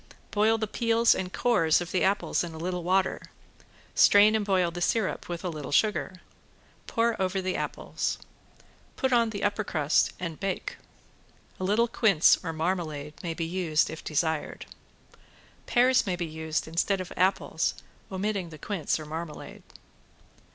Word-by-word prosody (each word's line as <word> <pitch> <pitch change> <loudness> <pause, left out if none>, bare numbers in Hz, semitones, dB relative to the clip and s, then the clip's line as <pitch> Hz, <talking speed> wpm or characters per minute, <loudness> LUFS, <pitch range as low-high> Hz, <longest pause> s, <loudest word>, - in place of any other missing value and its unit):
Boil 220 +2 +3
the 220 - -1
peels 230 +2 +3
and 185 -1 -4
cores 165 -11 +3
of 175 0 -5
the 185 - +1
apples 195 -1 +1
in 170 -2 -7
a - - -8
little 180 +2 -3
water, 185 +2 +1 0.7
strain 205 +1 +6
and 215 - +1
boil 185 -4 +1
the 175 +1 -6
syrup 215 +1 0
with 175 0 -5
a 180 - -2
little 150 -5 -6
sugar. 190 +2 +1 0.7
Pour 230 -1 +1
over 190 +1 0
the 185 0 -2
apples. - - -3 0.8
Put 265 -2 0
on 235 -2 +4
the 200 -2 -5
upper 205 +1 0
crust 155 -5 +1
and 170 -3 -5
bake. 195 -1 -3 0.8
A - - -4
little 210 +5 +2
quince 200 -8 +4
or 165 - -3
marmalade 160 -3 -3
may 165 -2 -4
be 165 - -2
used, 165 -3 0
if 160 - -8
desired. 160 0 -2 1.0
Pears 255 0 +3
may 185 - 0
be 175 -1 -3
used 160 0 -3
instead 175 +4 0
of 185 - -6
apples, 185 +2 +1 0.4
omitting 190 -2 -2
the 155 - -10
quince 170 0 -2
or 155 - -7
marmalade. 155 0 -7
185 Hz, 160 wpm, -27 LUFS, 165-205 Hz, 1.0 s, strain